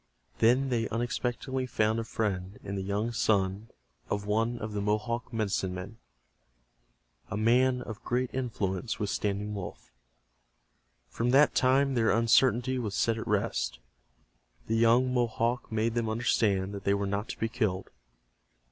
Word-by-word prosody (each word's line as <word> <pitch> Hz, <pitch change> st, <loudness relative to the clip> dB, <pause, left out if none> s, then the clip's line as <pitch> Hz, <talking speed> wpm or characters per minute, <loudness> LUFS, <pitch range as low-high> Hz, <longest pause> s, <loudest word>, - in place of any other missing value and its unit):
Then 125 Hz, +4 st, +4 dB
they 115 Hz, -3 st, 0 dB
unexpectedly 120 Hz, +3 st, -2 dB
found 110 Hz, -2 st, +1 dB
a -, -, -2 dB
friend 100 Hz, -4 st, -3 dB
in 100 Hz, -, -5 dB
the 100 Hz, -, -2 dB
young 100 Hz, +4 st, -1 dB
son 100 Hz, -1 st, 0 dB, 0.4 s
of 100 Hz, 0 st, -2 dB
one 115 Hz, +3 st, 0 dB
of 110 Hz, -2 st, -5 dB
the 105 Hz, -, -2 dB
Mohawk 110 Hz, +4 st, -1 dB
medicine 100 Hz, -5 st, -1 dB
men, 100 Hz, +5 st, -8 dB, 1.3 s
a 110 Hz, -, -3 dB
man 125 Hz, +3 st, +3 dB
of 110 Hz, -2 st, -8 dB
great 125 Hz, +1 st, -1 dB
influence 110 Hz, -4 st, -2 dB
with 105 Hz, -1 st, -2 dB
Standing 105 Hz, +1 st, -2 dB
Wolf. 90 Hz, -11 st, -7 dB, 1.2 s
From 115 Hz, -, -2 dB
that 140 Hz, +4 st, +5 dB
time 135 Hz, +2 st, +3 dB
their 115 Hz, -3 st, +2 dB
uncertainty 125 Hz, +2 st, +3 dB
was 105 Hz, -5 st, -3 dB
set 115 Hz, -1 st, +1 dB
at -, -, -6 dB
rest. 105 Hz, -, 0 dB, 0.9 s
The 115 Hz, -, -1 dB
young 120 Hz, +3 st, +4 dB
Mohawk 120 Hz, 0 st, 0 dB
made 110 Hz, +1 st, 0 dB
them 115 Hz, -1 st, -1 dB
understand 105 Hz, -4 st, +1 dB
that 100 Hz, -1 st, -6 dB
they 100 Hz, -, +2 dB
were 100 Hz, 0 st, -1 dB
not 100 Hz, +2 st, -2 dB
to -, -, -6 dB
be 115 Hz, -, +1 dB
killed. 95 Hz, -4 st, -2 dB
110 Hz, 150 wpm, -29 LUFS, 100-120 Hz, 1.3 s, that